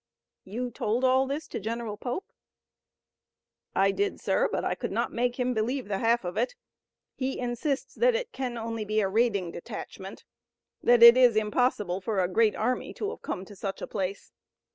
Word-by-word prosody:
"You 240 +6 -4
told 230 +2 -1
all 260 +1 +4
this 290 +3 -4
to - - -4
General 225 0 -4
Pope?" 250 - -5 1.4
"I 195 +1 +4
did, 405 - -1
sir, - - +1
but - - -1
I - - +1
could - - -4
not - - -1
make 245 +1 -1
him 250 0 +1
believe 240 +3 -1
the 195 -2 -2
half 230 -2 +2
of 180 +3 -4
it. 245 +3 0 0.6
He 265 0 -3
insists 250 +4 -2
that - - +3
it 485 0 -3
can 255 - -4
only 225 -1 -3
be 215 +1 0
a 195 - +1
raiding 200 -4 +1
detachment, 170 - -8 0.6
that 240 -1 +5
it 235 +1 +11
is 250 -3 +6
impossible 210 -4 +1
for 205 +1 -1
a 180 - +2
great 215 +3 +2
army 250 +3 -1
to 415 0 -3
have - - -10
come 185 - -4
to 205 - -12
such 195 0 -4
a - - -4
place. 195 0 -4
235 Hz, 185 wpm, -28 LUFS, 205-255 Hz, 1.4 s, it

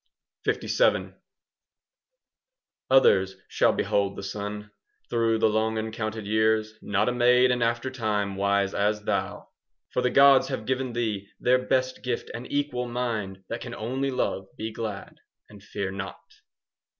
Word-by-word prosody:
LVII - - +1 1.8
Others 95 -8 +5
shall - - +3
behold 100 -1 0
the 100 - -7
sun 105 +1 -5 0.4
Through 115 -1 +2
the 110 - +3
long 110 +1 0
uncounted 110 -1 -4
years,— 110 +1 +2
Not 105 +1 0
a - - +3
maid 125 +1 +4
in 125 -1 0
after 120 +2 0
time 105 -5 -1
Wise 100 0 +1
as 105 +1 0
thou! - - -2 0.4
For - - +1
the 125 - +2
gods 140 0 +6
have 130 -5 -4
given 130 0 -1
thee 110 -4 -2
Their 125 +1 +3
best 130 0 0
gift, 125 -2 -3
an 120 +2 -6
equal 145 -4 -1
mind 110 -6 -3
5 - - -40
That 115 - -4
can 120 -1 -6
only 130 +5 -2
love, 95 -7 -2
be 110 +1 -4
glad, 110 -3 -6 0.3
And 105 -1 -14
fear 100 0 -4
not. 95 0 -6
110 Hz, 150 wpm, -26 LUFS, 105-125 Hz, 1.8 s, gods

